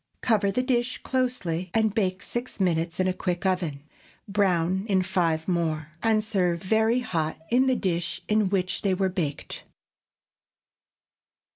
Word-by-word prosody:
Cover 210 -4 +2
the 250 +6 0
dish 250 -1 0
closely 200 -10 -1
and 220 -2 +3
bake 190 -4 0
six 240 -1 -4
minutes 170 -2 0
in 185 - +2
a 185 - +1
quick 180 0 -3
oven; 170 -7 -1 0.4
brown 190 -2 +1
in 190 -3 +2
five 170 -3 0
more, 165 -3 -1
and 220 -1 +2
serve 180 -5 0
very 220 +5 +2
hot 160 -9 -2
in 255 +2 +4
the 260 - +3
dish 180 -4 -2
in 210 -2 +2
which 185 -1 -1
they 195 -2 +1
were 190 0 +1
baked. 165 -7 -4
190 Hz, 145 wpm, -26 LUFS, 175-220 Hz, 0.4 s, in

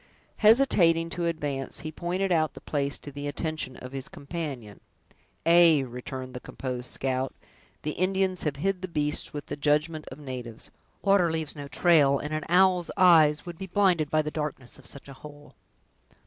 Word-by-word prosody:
Hesitating 180 -8 +4
to 170 0 -1
advance, 145 -5 -2
he 155 - -5
pointed 180 +4 -2
out 155 -2 +1
the - - -8
place 140 -2 -1
to 145 - -10
the 145 +1 -6
attention 155 -3 -4
of 125 - -9
his 135 -1 -5
companion. 140 - -6 0.7
"Ay," 165 -4 +6
returned 130 +1 -7
the 125 - -6
composed 125 -1 -5
scout, 130 0 -2 0.5
"the 150 - -1
Indians 185 +1 0
have 150 -3 -1
hid 185 +5 -1
the 185 - -3
beasts 150 -3 -1
with 145 -1 -6
the - - -5
judgment 150 +2 0
of 130 - -8
natives! 125 -5 -7 0.3
Water 195 -4 +4
leaves 160 -2 -3
no 145 -1 -7
trail, 145 -3 +4
and 150 +2 -5
an 155 -1 -2
owl's 180 -1 +4
eyes 160 -5 +5
would 175 -2 -8
be 190 - -5
blinded 180 -6 +2
by 155 +1 +2
the 150 - -4
darkness 150 -5 -5
of 130 - -12
such 140 - -8
a 140 - -9
hole." 145 -1 -12
150 Hz, 175 wpm, -27 LUFS, 140-175 Hz, 0.7 s, Ay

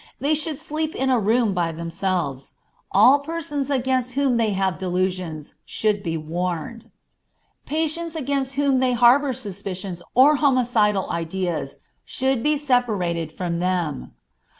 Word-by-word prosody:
They 290 +3 +1
should 310 -1 -1
sleep 310 +2 -4
in 265 0 0
a 250 - +3
room 220 0 +2
by 175 -2 0
themselves. 165 -4 -3 0.4
All 250 +8 +6
persons 290 -2 -4
against 255 -2 0
whom 270 -2 +1
they 225 -2 +2
have 190 -2 -1
delusions 180 -4 -2
should 210 -2 0
be 165 -4 -2
warned. 175 +6 -4 0.8
Patients 320 +2 -1
against 275 -2 -2
whom 275 -2 +2
they 255 -1 +2
harbor 250 +4 +5
suspicious 195 -6 -5
or 280 +4 +6
homicidal 245 -8 +2
ideas 170 -3 -3 0.2
should 265 -2 0
be 300 +3 +2
separated 210 - 0
from 170 0 -3
them. 175 - -2
225 Hz, 130 wpm, -23 LUFS, 180-270 Hz, 0.8 s, All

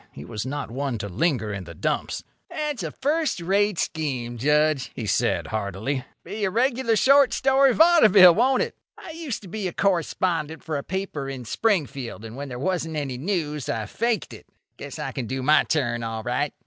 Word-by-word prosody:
He 70 - -10
was 105 +6 -5
not 145 -2 -4
one 135 -1 -2
to 100 - -5
linger 110 - 0
in 95 -2 -6
the 85 0 -10
dumps. - - -2 0.3
"That's 300 -6 -3
a 165 - -3
first 295 - -1
rate 195 +3 +1
scheme, 125 -8 -3
Judge," 150 0 +2
he 115 - -4
said, 95 - +1
heartily. 110 +6 -3 0.2
"Be 210 0 -5
a 195 - +2
regular 240 +2 +1
short 275 +4 +5
story 270 0 +4
vaudeville, 215 - +7
won't 255 +6 +3
it? - - -6 0.2
I 330 - -9
used 315 -10 -5
to - - -10
be 190 0 -3
correspondent 170 -3 0
for 155 -2 -2
a - - -7
paper 185 -7 -4
in 130 -3 -6
Springfield, 140 - -1
and 115 +1 -8
when 140 +1 -6
there 125 - -6
wasn't 165 +2 -2
any 135 -4 -3
news 150 - -2
I 110 -1 -2
faked 230 - -2
it. - - -13 0.3
Guess - - -8
I - - -4
can 125 -4 -4
do 130 +1 -3
my 150 +3 +5
turn 120 -6 0
all 115 -1 -4
right." 125 +5 -1
155 Hz, 190 wpm, -24 LUFS, 125-205 Hz, 0.3 s, vaudeville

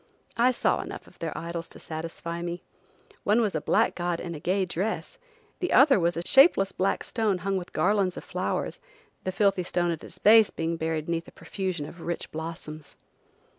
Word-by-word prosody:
I 240 +2 +4
saw 255 - +1
enough - - -8
of - - -20
their - - -4
idols 170 0 -5
to - - -13
satisfy 165 +1 -5
me. 175 0 -4 0.6
One 210 +3 +3
was 215 -4 +1
a 155 - -1
black - - +2
god 175 -1 -2
in 170 - -5
a 155 - -6
gay 190 +4 +1
dress, 200 - -3 0.4
the 360 - -1
other 270 -4 +6
was 170 0 +1
a 170 - -3
shapeless 265 - +6
black 190 +1 0
stone 215 -5 0
hung 195 +2 -2
with 180 -2 -4
garlands 195 -2 +1
of - - -6
flowers, - - -2 0.5
the 185 - 0
filthy 195 -1 +2
stone 175 -1 0
at 165 - -5
its - - -9
base 220 0 +7
being 165 +1 -2
buried 160 -1 -2
'neath 170 0 -2
a - - -12
profusion 185 -6 -4
of 170 +3 -11
rich 170 +1 -4
blossoms. 155 -2 -7
175 Hz, 195 wpm, -27 LUFS, 165-200 Hz, 0.6 s, base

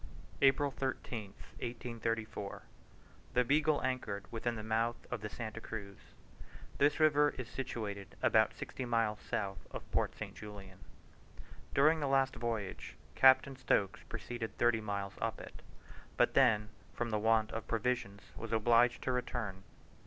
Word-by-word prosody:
APRIL 140 +1 +4
13, 130 -4 -3 0.4
1834. 115 -4 -3 0.7
The 125 - +5
Beagle 150 +4 +2
anchored 125 -6 -2
within 120 +1 -2
the 110 - -5
mouth 115 +2 +1 0.2
of - - -2
the 105 - -4
Santa 115 0 -6
Cruz. 100 -4 -7 0.8
This 145 +2 +4
river 150 -1 +4
is 130 -2 -4
situated 105 -7 -5
about - - +4
sixty 130 - -5
miles 115 -3 +1
south 95 -2 -3
of - - -6
Port - - 0
St. - - -6
Julian. 100 -3 -10 1.0
During 155 +3 +5
the 145 - 0
last 135 0 +2
voyage 115 -5 -4 0.2
Captain 135 +1 +6
Stokes 125 -7 +1
proceeded 120 -2 -5
thirty 120 -2 +3
miles 100 -2 -3
up 115 0 -1
it, - - -10 0.6
but - - +4
then, 105 -5 +4 0.3
from 120 -1 -2
the 105 - +1
want 110 0 +3
of 110 - -5
provisions, 115 -3 -1
was 115 - -7
obliged 115 +2 +4
to 130 - 0
return. 115 -6 -3
115 Hz, 140 wpm, -34 LUFS, 105-130 Hz, 1.0 s, Captain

